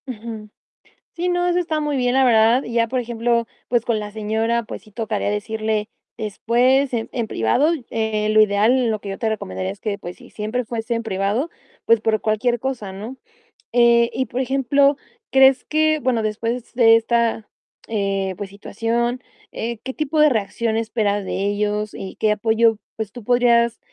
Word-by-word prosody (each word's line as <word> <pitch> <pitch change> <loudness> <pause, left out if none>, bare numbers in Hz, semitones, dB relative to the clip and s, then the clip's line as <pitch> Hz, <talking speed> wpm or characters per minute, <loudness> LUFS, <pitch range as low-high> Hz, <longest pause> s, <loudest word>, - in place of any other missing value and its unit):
Ujú. 220 -3 -7 0.6
Sí, 350 +1 -2
no, 355 0 +1
eso 355 0 +2
está 320 -3 -1
muy 295 -2 -1
bien, 250 -1 +1
la 265 0 +4
verdad. 230 +2 +4
Y 235 - -7
ya, 230 -1 +2
por 255 +2 -1
ejemplo, 235 0 0 0.2
pues, 240 -2 +1
con 230 -3 0
la 210 0 -6
señora, 220 +2 -1
pues - - -8
sí, 215 - -20
tocaría 220 -1 -2
decirle 215 +1 -2 0.3
después 250 +6 +1
en 225 -2 -2
en 235 -3 -2
privado. 210 - +2 0.2
Eh, 220 -1 -1
lo 215 0 +5
ideal, 220 +4 +3
lo 215 -1 -1
que 200 - -8
yo 195 - -5
te 225 -3 0
recomendaría 95 - -3
es 100 - -11
que, 205 -2 -3
pues 180 -3 -8
sí, - - -16
siempre 220 +4 -3
fuese 230 +1 -3
en 230 - -2
privado, 210 - -1 0.4
pues, 230 -1 +5
por 220 -1 +1
cualquier 235 +3 0
cosa, 240 -6 -4
¿no? 220 +7 -8 0.6
Eh, 235 -1 +5
y 260 - -1
por 245 +4 -2
ejemplo, 275 +2 +2 0.3
¿crees 265 0 +5
que, 310 0 +2
bueno, 245 -5 0
después 230 +3 -3
de 225 -2 +7
esta, 230 -1 0 0.4
eh, 195 -3 -1
pues 205 -2 -6
situación, 235 +4 -2 0.3
eh, 235 0 -4
qué 260 - -5
tipo 305 +1 -1
de 300 0 +7
reacción 225 -1 -1
esperas 215 -3 -1
de 195 - -2
ellos 210 +1 -1
y 190 - -7
qué 215 - +2
apoyo, 225 +1 +2 0.2
pues 220 -3 -4
tú 245 0 -10
podrías, 235 0 +3
230 Hz, 185 wpm, -21 LUFS, 215-245 Hz, 0.6 s, de